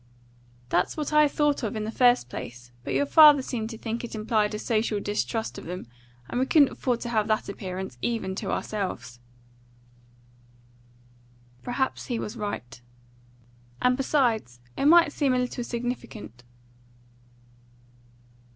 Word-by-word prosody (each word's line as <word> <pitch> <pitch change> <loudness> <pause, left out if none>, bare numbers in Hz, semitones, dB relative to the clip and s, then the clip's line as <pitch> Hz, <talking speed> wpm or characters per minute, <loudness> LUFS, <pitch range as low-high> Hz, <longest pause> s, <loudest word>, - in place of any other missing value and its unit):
"That's 180 - +1
what 300 0 -3
I 300 0 +6
thought 295 0 +1
of 225 -3 -3
in 215 - -2
the 215 - -3
first 245 - +4
place, 120 0 -8
but - - -3
your 285 - +2
father 295 -2 +7
seemed 225 -4 -3
to 225 - -7
think 225 +2 -4
it 235 - -6
implied 215 -1 0
a - - -2
social 220 -1 0
distrust 215 +2 -2
of - - -11
them; 180 -1 -6 0.4
and 245 - -2
we 260 - +1
couldn't 290 -3 +5
afford 245 -3 -1
to 240 - -4
have 215 -3 +1
that 215 -1 0
appearance, 190 -8 -6
even 225 -5 -2
to - - -4
ourselves." 130 - -4 2.4
"Perhaps 255 +2 -2
he 240 - -2
was 215 +1 -5
right." 135 - -5 1.0
"And 250 0 +3
besides, 240 - 0 0.2
it - - -1
might 335 -1 +6
seem 275 -4 +1
a - - +2
little 250 -1 -2
significant." 235 - -6
230 Hz, 145 wpm, -26 LUFS, 205-255 Hz, 2.4 s, father